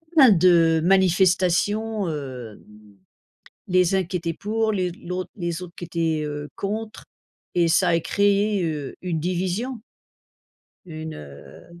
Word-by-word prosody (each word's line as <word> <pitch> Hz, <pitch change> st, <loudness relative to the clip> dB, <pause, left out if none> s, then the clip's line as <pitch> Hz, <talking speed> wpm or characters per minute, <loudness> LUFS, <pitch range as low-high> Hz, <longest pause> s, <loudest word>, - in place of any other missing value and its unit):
pas 300 Hz, -, +8 dB
mal 215 Hz, -7 st, +6 dB
de 165 Hz, -2 st, +5 dB
manifestations, 190 Hz, +3 st, +2 dB
heu, 130 Hz, -8 st, -6 dB, 1.1 s
les 180 Hz, 0 st, +3 dB
uns 190 Hz, -, +3 dB
qui 180 Hz, +2 st, -4 dB
étaient 170 Hz, -1 st, -3 dB
pour, 220 Hz, +3 st, -1 dB
les 185 Hz, -3 st, -1 dB
l'autre 180 Hz, +1 st, -6 dB
les 170 Hz, -2 st, -3 dB
autres, 175 Hz, -1 st, -10 dB
qui -, -, -6 dB
étaient, 165 Hz, -2 st, -1 dB
heu, 145 Hz, 0 st, -5 dB
contre 215 Hz, +2 st, -4 dB, 0.5 s
et 170 Hz, -1 st, +3 dB
ça 180 Hz, +2 st, +3 dB
a 165 Hz, -1 st, +3 dB
créé, 200 Hz, +1 st, +1 dB
heu, 150 Hz, -4 st, -4 dB
une 175 Hz, -3 st, -2 dB
division. 185 Hz, +8 st, -2 dB, 1.0 s
Une, 160 Hz, -2 st, -7 dB
heu 70 Hz, -, -13 dB
180 Hz, 135 wpm, -23 LUFS, 165-195 Hz, 1.1 s, pas